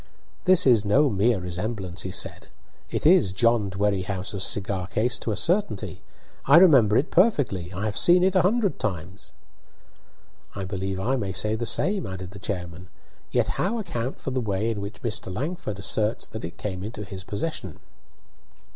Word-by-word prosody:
"This 185 Hz, -2 st, +5 dB
is 120 Hz, -6 st, +5 dB
no 135 Hz, +7 st, +3 dB
mere 105 Hz, +2 st, +2 dB
resemblance," 90 Hz, +1 st, -4 dB
he 95 Hz, -, -5 dB
said. -, -, -2 dB, 0.4 s
"It -, -, -3 dB
is 160 Hz, -, +5 dB
John 110 Hz, +1 st, +2 dB
Dwerrihouse's 95 Hz, 0 st, -2 dB
cigar 95 Hz, -3 st, +1 dB
case 110 Hz, +1 st, 0 dB
to 115 Hz, -, -3 dB
a -, -, -1 dB
certainty. 165 Hz, -, -1 dB, 0.4 s
I 140 Hz, +4 st, +7 dB
remember 130 Hz, -, +6 dB
it 145 Hz, -, 0 dB
perfectly; 130 Hz, -, +2 dB
I 100 Hz, +3 st, -4 dB
have 105 Hz, -2 st, -2 dB
seen 175 Hz, +1 st, +5 dB
it 190 Hz, +1 st, +2 dB
a 185 Hz, -, +5 dB
hundred 205 Hz, +1 st, +1 dB
times." 90 Hz, 0 st, -5 dB, 1.2 s
"I 100 Hz, -1 st, -4 dB
believe 95 Hz, 0 st, -4 dB
I 130 Hz, +7 st, 0 dB
may 100 Hz, -5 st, -3 dB
say 105 Hz, +4 st, 0 dB
the 115 Hz, +1 st, -2 dB
same," 195 Hz, -, +1 dB
added 95 Hz, -1 st, -7 dB
the 100 Hz, -, -11 dB
chairman; 90 Hz, -3 st, -5 dB, 0.4 s
"yet -, -, +1 dB
how 210 Hz, +6 st, 0 dB
account 130 Hz, -, -4 dB
for 135 Hz, -, -5 dB
the 130 Hz, 0 st, -1 dB
way 105 Hz, +1 st, -1 dB
in 105 Hz, -3 st, -4 dB
which 100 Hz, +2 st, -8 dB
Mr. 110 Hz, -5 st, -2 dB
Langford 140 Hz, -, -4 dB
asserts 105 Hz, +2 st, -1 dB
that 110 Hz, -, -9 dB
it 80 Hz, -, -7 dB
came 95 Hz, -3 st, -5 dB
into 105 Hz, 0 st, -6 dB
his 95 Hz, -1 st, -8 dB
possession?" 100 Hz, -, -5 dB
105 Hz, 175 wpm, -25 LUFS, 95-130 Hz, 1.2 s, I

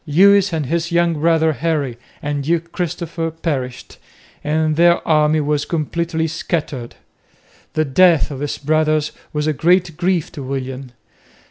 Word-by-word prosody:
Lewis 200 Hz, +5 st, +5 dB
and 160 Hz, -3 st, -1 dB
his 170 Hz, +4 st, -2 dB
young 170 Hz, 0 st, +2 dB
brother, 160 Hz, 0 st, +2 dB
Henry, 150 Hz, -5 st, -1 dB, 0.3 s
and 145 Hz, -1 st, -2 dB
Duke 170 Hz, +2 st, -1 dB
Christopher 170 Hz, -2 st, -3 dB
perished, 140 Hz, -6 st, -5 dB, 0.4 s
and 155 Hz, +1 st, +1 dB
their 170 Hz, +1 st, +3 dB
army 155 Hz, 0 st, +3 dB
was 145 Hz, 0 st, 0 dB
completely 165 Hz, +1 st, -2 dB
scattered. 150 Hz, -6 st, -3 dB, 0.8 s
The 155 Hz, -1 st, +1 dB
death 165 Hz, +2 st, +4 dB
of 135 Hz, -, -6 dB
his 145 Hz, 0 st, -3 dB
brothers 155 Hz, 0 st, +1 dB, 0.2 s
was 150 Hz, 0 st, -2 dB
a 155 Hz, -, +1 dB
great 170 Hz, +1 st, +2 dB
grief 175 Hz, -2 st, 0 dB
to 145 Hz, -, -8 dB
William. 130 Hz, -1 st, -5 dB
155 Hz, 140 wpm, -19 LUFS, 145-170 Hz, 0.8 s, Lewis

